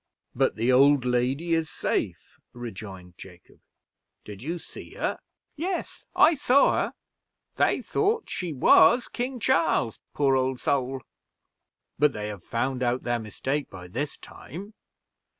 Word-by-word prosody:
"But - - +1
the 115 +4 +1
old 135 0 +5
lady 130 +7 0
is 165 -2 0
safe," - - -3
rejoined 95 -7 -9
Jacob. 90 -2 -14 0.6
"Did 105 -1 -10
you 165 +7 -3
see - - -12
her?" - - -2 0.4
"Yes, 350 +4 -4
I 335 - +6
saw 280 -2 +4
her; - - -1 0.6
they - - +2
thought 430 +2 0
she 180 -3 -4
was 230 - +5
King 250 +1 -4
Charles 165 - +1 0.2
poor 140 -2 +3
old 130 -1 0
soul." 130 -2 -1 1.0
"But 150 -2 +4
they 105 0 -4
have 100 -4 -8
found 130 +2 -2
out 125 0 0
their 120 -1 0
mistake 135 +6 -3
by 90 -1 -10
this 140 +10 -4
time?" 195 - -10
130 Hz, 135 wpm, -26 LUFS, 115-165 Hz, 1.0 s, I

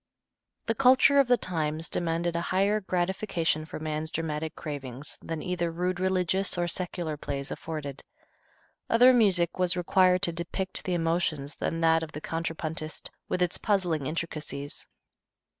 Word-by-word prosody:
The 225 - +1
culture 265 +3 +5
of 275 - +5
the 245 0 +5
times 160 -4 -2
demanded 170 0 -1
a 170 - 0
higher 195 +4 +1
gratification 180 -3 -1
for 155 - -7
man's 155 0 -3
dramatic 160 -1 -3
cravings 140 -3 -6
than 165 -2 -5
either 175 -1 -1
rude 180 +2 -2
religious 185 0 +1
or 175 0 +1
secular 175 -3 -3
plays 140 -1 -5
afforded. 145 -4 -6 0.9
Other 245 +3 +7
music 185 -8 +3
was 180 0 +2
required 180 +1 +3
to 170 - +4
depict 185 +3 0
the 180 - 0
emotions 165 -3 0
than 165 0 -3
that 165 0 +4
of 160 -1 -6
the 150 - -6
contrapuntist, 160 -1 -4 0.2
with 180 - +1
its 175 - -1
puzzling 175 -9 0
intricacies. 155 -3 -5
170 Hz, 145 wpm, -28 LUFS, 155-185 Hz, 0.9 s, Other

